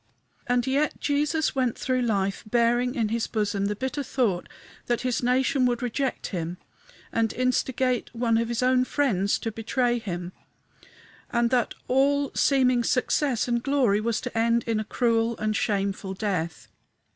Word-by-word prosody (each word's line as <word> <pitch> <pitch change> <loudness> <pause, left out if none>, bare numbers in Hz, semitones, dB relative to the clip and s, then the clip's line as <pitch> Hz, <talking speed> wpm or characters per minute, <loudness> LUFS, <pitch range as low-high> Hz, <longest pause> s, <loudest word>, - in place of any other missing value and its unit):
And 245 -1 +2
yet 280 +3 0
Jesus 300 +2 0
went 255 -4 0
through 255 -1 0
life 200 -4 0
bearing 240 +2 +2
in 225 -5 0
his 230 0 -1
bosom 205 -2 -1
the 210 - -2
bitter 260 +6 -3
thought 240 -9 -1 0.4
that 240 -1 0
his 250 -2 -1
nation 255 +1 +2
would 240 0 -1
reject 255 +2 -2
him 170 0 -3 0.6
and 225 -1 +1
instigate 255 0 0
one 230 -1 +1
of 230 - 0
his 235 +1 -1
own 255 0 +4
friends 220 -8 +1
to 225 - -4
betray 240 +2 0
him, 180 -4 -5 1.0
and 235 0 +1
that 245 -3 +1
all 280 +2 +2
seeming 255 -3 +3
success 250 +1 +1
and 235 -1 0
glory 250 -7 +2
was 230 +1 0
to 250 -2 -6
end 230 +1 +2
in 225 -2 -1
a - - -1
cruel 230 0 +1
and 215 0 -1
shameful 195 0 -1
death. 180 -5 -3
240 Hz, 155 wpm, -26 LUFS, 215-255 Hz, 1.0 s, own